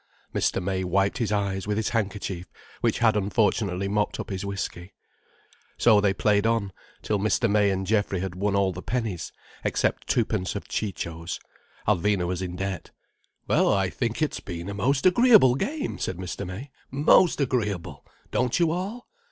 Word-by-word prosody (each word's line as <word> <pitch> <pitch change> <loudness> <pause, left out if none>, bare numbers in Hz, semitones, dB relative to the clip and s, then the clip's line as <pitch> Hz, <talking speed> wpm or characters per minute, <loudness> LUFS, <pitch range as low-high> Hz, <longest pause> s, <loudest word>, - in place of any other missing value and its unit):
Mr. - - +1
May 95 0 -1
wiped 95 +4 +1
his 115 -3 0
eyes, 100 -2 -1
with 105 0 0
his 110 - 0
handkerchief 100 -5 -2 0.3
which - - +1
had 115 -2 +3
unfortunately 100 -2 +1
mopped 105 +1 0
up - - -5
his 95 0 -3
whiskey. 100 -2 -5 0.8
So 110 -3 +5
they 100 -1 +3
played 105 +2 +2
on, 110 -4 0 0.3
till 105 - 0
Mr. 110 +4 +2
May 105 -1 +3
and 95 0 -1
Geoffrey 100 -2 +1
had 95 0 -3
won 100 +2 0
all 100 -1 +2
the 90 - -7
pennies, 110 -8 -3 0.3
except - - 0
twopence 110 -6 0
of 100 - -5
Ciccio's. 85 -5 -4 0.5
Alvina 100 -1 +2
was 90 +1 -2
in 90 -1 -4
debt. 95 -1 -4 0.6
"Well - - +3
I 95 -3 +1
think 120 +4 -1
it's 155 - -1
been 85 0 -6
a - - -4
most 135 +7 0
agreeable 205 - +6
game," 285 - -3
said 95 - -2
Mr. 90 -1 -5
May. 110 +10 -7 0.2
"Most 150 +6 +4
agreeable! 110 - -1 0.3
Don't 125 +5 +1
you 170 -2 +3
all?" 195 +8 -4
100 Hz, 170 wpm, -26 LUFS, 95-115 Hz, 0.8 s, agreeable